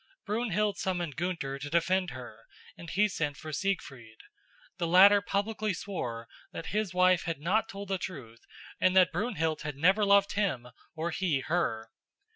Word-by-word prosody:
Brunhild 210 Hz, -2 st, -1 dB
summoned 175 Hz, -6 st, -2 dB
Gunther 165 Hz, -6 st, -3 dB
to 145 Hz, +1 st, -6 dB
defend 180 Hz, +3 st, +1 dB
her, 120 Hz, -5 st, -10 dB, 0.3 s
and 170 Hz, -, -10 dB
he 210 Hz, +4 st, +3 dB
sent 150 Hz, -7 st, -3 dB
for 155 Hz, -1 st, -8 dB
Siegfried. 135 Hz, -, -3 dB, 0.6 s
The 170 Hz, -, 0 dB
latter 200 Hz, +4 st, +7 dB
publicly 205 Hz, 0 st, -1 dB
swore 120 Hz, -, -5 dB, 0.2 s
that -, -, -7 dB
his 210 Hz, -3 st, 0 dB
wife 185 Hz, -1 st, +3 dB
had 165 Hz, -3 st, -3 dB
not 210 Hz, +9 st, 0 dB
told 200 Hz, -2 st, -8 dB
the 190 Hz, -1 st, -1 dB
truth 125 Hz, -11 st, -8 dB, 0.4 s
and 185 Hz, 0 st, +3 dB
that 185 Hz, -1 st, +6 dB
Brunhild 165 Hz, -5 st, -1 dB
had 150 Hz, -1 st, -5 dB
never 185 Hz, +9 st, +3 dB
loved 200 Hz, 0 st, +4 dB
him 170 Hz, -13 st, -1 dB, 0.3 s
or 165 Hz, +2 st, -2 dB
he 160 Hz, -7 st, 0 dB
her. 115 Hz, -10 st, -1 dB
180 Hz, 160 wpm, -29 LUFS, 150-200 Hz, 0.6 s, latter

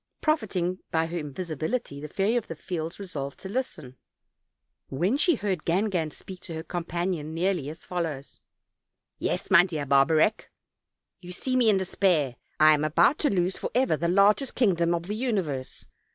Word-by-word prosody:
Profiting 190 Hz, -, 0 dB
by 160 Hz, 0 st, +1 dB
her 170 Hz, +1 st, -4 dB
invisibility, 155 Hz, -, -4 dB
the 150 Hz, -, -5 dB
Fairy 195 Hz, +8 st, 0 dB
of 240 Hz, -, -1 dB
the 165 Hz, -, -6 dB
Fields 165 Hz, +2 st, -5 dB
resolved 145 Hz, -8 st, -5 dB
to -, -, -6 dB
listen, 190 Hz, -, -4 dB, 0.9 s
when 175 Hz, -, +1 dB
she 330 Hz, +3 st, +3 dB
heard 195 Hz, -8 st, -2 dB
Gangan 180 Hz, -2 st, 0 dB
speak 185 Hz, +3 st, -10 dB
to 170 Hz, -2 st, -7 dB
her 160 Hz, -, -5 dB
companion 170 Hz, -2 st, -3 dB
nearly 175 Hz, -4 st, 0 dB
as 155 Hz, -, -10 dB
follows: 160 Hz, -6 st, -4 dB, 0.8 s
"Yes, -, -, -2 dB
my -, -, +8 dB
dear 160 Hz, -6 st, -3 dB
Barbarec, 155 Hz, +9 st, +3 dB, 0.8 s
you 180 Hz, -1 st, -9 dB
see 255 Hz, +8 st, -2 dB
me 245 Hz, -3 st, +4 dB
in 205 Hz, -, +4 dB
de 190 Hz, -, -1 dB
spair; 170 Hz, -9 st, +1 dB, 0.3 s
I 155 Hz, 0 st, +8 dB
am 150 Hz, 0 st, +1 dB
about 170 Hz, -, +3 dB
to 295 Hz, -, +2 dB
lose 185 Hz, -3 st, 0 dB
forever 250 Hz, -6 st, +1 dB
the 165 Hz, +3 st, -1 dB
largest 200 Hz, +8 st, +3 dB
kingdom 175 Hz, -7 st, +2 dB
of 170 Hz, -, -3 dB
the 200 Hz, +4 st, -4 dB
universe. 190 Hz, -, -2 dB
175 Hz, 165 wpm, -27 LUFS, 155-200 Hz, 0.9 s, my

